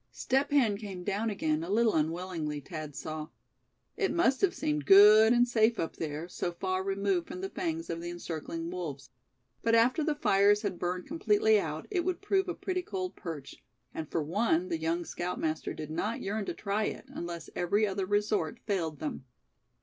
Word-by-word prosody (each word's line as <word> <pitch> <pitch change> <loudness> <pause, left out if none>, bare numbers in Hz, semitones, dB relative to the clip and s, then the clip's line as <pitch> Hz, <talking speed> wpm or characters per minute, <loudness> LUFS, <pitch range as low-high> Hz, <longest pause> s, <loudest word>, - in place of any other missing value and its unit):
Step 270 +2 0
Hen 240 -8 +3
came 195 -4 -7
down 205 +4 -1
again 160 -6 0
a 170 - -6
little 225 +2 +3
unwillingly, 160 -1 -1
Thad 155 -2 -7
saw. 155 -1 -5 0.7
It 390 - 0
must 335 -6 +2
have 385 -2 +2
seemed 150 -2 -1
good 210 +3 +9
and 245 0 +4
safe 230 -1 +3
up 165 - -3
there, 155 +1 -4
so 175 0 -3
far 185 +1 -1
removed 195 -2 0
from 365 - -7
the 385 - -4
fangs 330 -2 -3
of 165 - -4
the 175 - -5
encircling 165 -1 -5
wolves; 155 -8 -6 0.5
but 230 0 +3
after 245 +7 +4
the 305 -1 0
fires 205 -6 +4
had 190 -4 -2
burned 180 +1 -2
completely 415 +7 +3
out, - - -4
it 360 -4 +1
would 360 0 -1
prove 390 -2 +1
a 350 - -2
pretty 365 -1 -2
cold 185 - -4
perch; 155 -5 -8 0.3
and 155 -2 -5
for 165 - -1
one 180 +1 +1
the 165 -2 -1
young 165 +2 -1
scoutmaster 165 -3 -3
did 155 -1 -6
not 210 +8 -2
yearn 205 +1 -2
to - - -3
try 210 +1 -1
it, - - -4
unless 170 -1 -6
every 200 +5 +2
other 195 -2 -2
resort 205 -5 0
failed 170 -7 -1
them. 150 -3 -5
195 Hz, 190 wpm, -30 LUFS, 165-230 Hz, 0.7 s, good